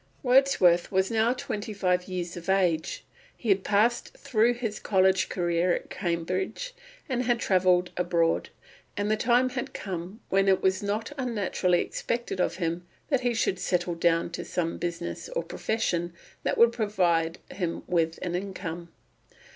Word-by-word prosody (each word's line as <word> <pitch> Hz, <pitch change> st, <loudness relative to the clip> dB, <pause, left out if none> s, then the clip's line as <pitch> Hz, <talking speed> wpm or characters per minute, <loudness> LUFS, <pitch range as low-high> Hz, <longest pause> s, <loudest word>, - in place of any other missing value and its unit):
Wordsworth 245 Hz, -10 st, +4 dB
was 190 Hz, +1 st, +1 dB
now 225 Hz, +1 st, +3 dB
twenty 215 Hz, -3 st, -4 dB
five 180 Hz, -2 st, 0 dB
years 180 Hz, -2 st, -4 dB
of 175 Hz, +1 st, -7 dB
age; 190 Hz, -, +1 dB, 0.3 s
he 235 Hz, -, -4 dB
had 195 Hz, -1 st, +3 dB
passed 220 Hz, +4 st, +1 dB
through 235 Hz, +2 st, +2 dB
his 225 Hz, -3 st, -4 dB
college 190 Hz, -1 st, +2 dB
career 175 Hz, 0 st, +1 dB
at -, -, -7 dB
Cambridge 185 Hz, -, -2 dB, 0.3 s
and 255 Hz, -4 st, 0 dB
had 240 Hz, -1 st, +2 dB
travelled 180 Hz, -2 st, +3 dB
abroad, 170 Hz, -2 st, +1 dB, 0.5 s
and 205 Hz, +1 st, 0 dB
the -, -, +4 dB
time 245 Hz, +3 st, +3 dB
had 250 Hz, -1 st, -5 dB
come 185 Hz, +2 st, -5 dB
when 195 Hz, +1 st, +3 dB
it 190 Hz, -1 st, +4 dB
was 190 Hz, 0 st, +2 dB
not 210 Hz, +4 st, -2 dB
unnaturally 200 Hz, -7 st, +1 dB
expected 235 Hz, -5 st, -3 dB
of -, -, 0 dB
him 175 Hz, -1 st, -3 dB, 0.2 s
that 270 Hz, -4 st, +3 dB
he 245 Hz, -1 st, 0 dB
should 190 Hz, -4 st, 0 dB
settle 175 Hz, -1 st, 0 dB
down 170 Hz, 0 st, +1 dB
to -, -, -5 dB
some 165 Hz, -2 st, -2 dB
business 170 Hz, -, -4 dB
or -, -, 0 dB
profession 175 Hz, -6 st, -2 dB, 0.3 s
that -, -, -1 dB
would 235 Hz, 0 st, +6 dB
provide 180 Hz, -7 st, +1 dB
him 175 Hz, -3 st, -3 dB
with 165 Hz, -2 st, 0 dB
an 175 Hz, -, -2 dB
income. 175 Hz, -2 st, -5 dB
190 Hz, 155 wpm, -27 LUFS, 175-225 Hz, 0.5 s, would